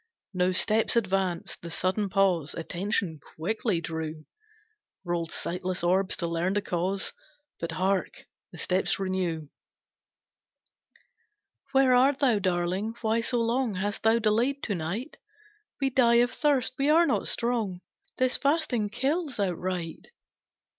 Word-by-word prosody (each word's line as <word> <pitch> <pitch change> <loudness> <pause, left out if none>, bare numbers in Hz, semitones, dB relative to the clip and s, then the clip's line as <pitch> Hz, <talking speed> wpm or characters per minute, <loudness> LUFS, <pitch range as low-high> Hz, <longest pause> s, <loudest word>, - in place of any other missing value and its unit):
No 180 0 +2
steps 215 +5 +2
advanced, 190 -5 -1
the 170 - -7
sudden 185 +4 -1
pause 185 -6 +1
Attention 170 -1 -2 0.2
quickly 200 +2 -1
drew, 160 -2 -5 0.8
Rolled 170 -1 -2
sightless 180 +1 -3
orbs 185 +2 +2
to 170 - -2
learn 170 +3 0
the 205 - +1
cause, 185 +2 -1 0.5
But, 165 -1 -3
hark! 190 +3 -1 0.3
the - - -11
steps 185 +1 +1
renew. 180 -5 -2 2.2
"Where 265 -1 +5
art 265 +3 +4
thou, 250 -7 +3
darling 185 +4 -1
why 225 0 +1
so 240 0 0
long 230 -1 0
Hast 205 +2 -2
thou 225 +1 +4
delayed 235 +5 +1
to 210 - -1
night? 190 - -4 0.6
We 270 -1 +1
die 240 -2 +4
of 245 +1 +4
thirst, 280 -5 +1
we 275 +2 +2
are 330 +3 +6
not 285 - 0
strong, 225 -7 0 0.4
This 255 0 +2
fasting 280 -8 +1
kills 280 - -1
outright. 180 -3 -2
195 Hz, 130 wpm, -28 LUFS, 180-240 Hz, 2.2 s, are